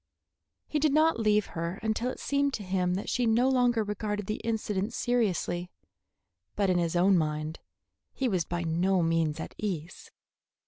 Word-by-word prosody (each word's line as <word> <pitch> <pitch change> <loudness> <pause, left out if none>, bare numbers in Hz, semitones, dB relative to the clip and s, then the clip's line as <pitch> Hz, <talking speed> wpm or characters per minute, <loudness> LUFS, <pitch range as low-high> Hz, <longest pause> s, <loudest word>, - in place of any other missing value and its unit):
He 300 - -1
did 300 -1 +2
not 310 -3 +4
leave 210 -1 +3
her 170 +3 -3
until 225 +3 0
it - - -6
seemed 280 -1 0
to 210 - -6
him 185 -1 0
that 195 - -4
she 245 -2 +1
no 235 +3 +3
longer 245 -3 +3
regarded 210 0 -3
the 215 +3 -3
incident 215 -1 -1
seriously; 190 -8 0 0.9
but 200 -2 +2
in 180 - +2
his 170 0 -1
own 185 +1 +4
mind 155 0 -2 0.5
he 265 - -1
was 185 -7 +1
by 175 +2 -3
no 175 +3 +1
means 165 -2 +1
at - - -6
ease. 175 -5 -4
200 Hz, 170 wpm, -29 LUFS, 175-230 Hz, 0.9 s, not